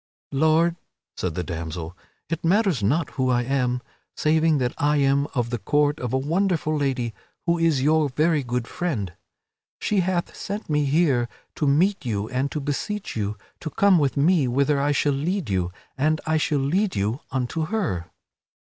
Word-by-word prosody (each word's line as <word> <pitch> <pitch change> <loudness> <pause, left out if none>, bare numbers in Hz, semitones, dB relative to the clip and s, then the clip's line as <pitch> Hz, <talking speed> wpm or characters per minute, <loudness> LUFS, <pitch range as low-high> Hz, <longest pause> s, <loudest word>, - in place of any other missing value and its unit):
"Lord," 160 +4 +3 0.4
said 90 -4 -3
the 90 - -1
damsel, 85 0 -5 0.3
"it 165 +1 -3
matters 185 - +2
not 145 +11 +1
who 130 -1 0
I 120 -1 +2
am, 125 -1 0 0.3
saving 155 0 +3
that 125 -2 0
I 150 0 +3
am 140 0 +3
of 120 -2 0
the 120 - -1
court 145 +4 +1
of 125 -2 -3
a 130 - +2
wonderful 160 +2 0
lady 130 -5 -1 0.3
who 170 -1 +2
is 160 -5 +2
your 155 0 +3
very 155 +3 +2
good 125 -2 -2
friend. 115 - -3 0.7
She 210 - +1
hath 180 -1 -1
sent 205 -4 -5
me 150 -1 +2
here 135 -5 +2 0.2
to 150 - -1
meet 170 +7 +3
you 105 -4 -2
and 130 +3 -1
to 150 - -2
beseech 155 +9 -3
you 105 -1 -2 0.2
to 155 - -5
come 195 +1 +4
with 140 -1 0
me 155 -1 +4
whither 140 +3 +2
I 145 +1 +2
shall 145 0 +2
lead 160 - -1
you, 90 -2 0 0.3
and 155 +2 +2
I 160 0 +2
shall 150 -1 +1
lead 180 +9 +1
you 105 +6 0
unto 135 +5 -2
her." 155 - -2
145 Hz, 175 wpm, -24 LUFS, 125-165 Hz, 0.7 s, come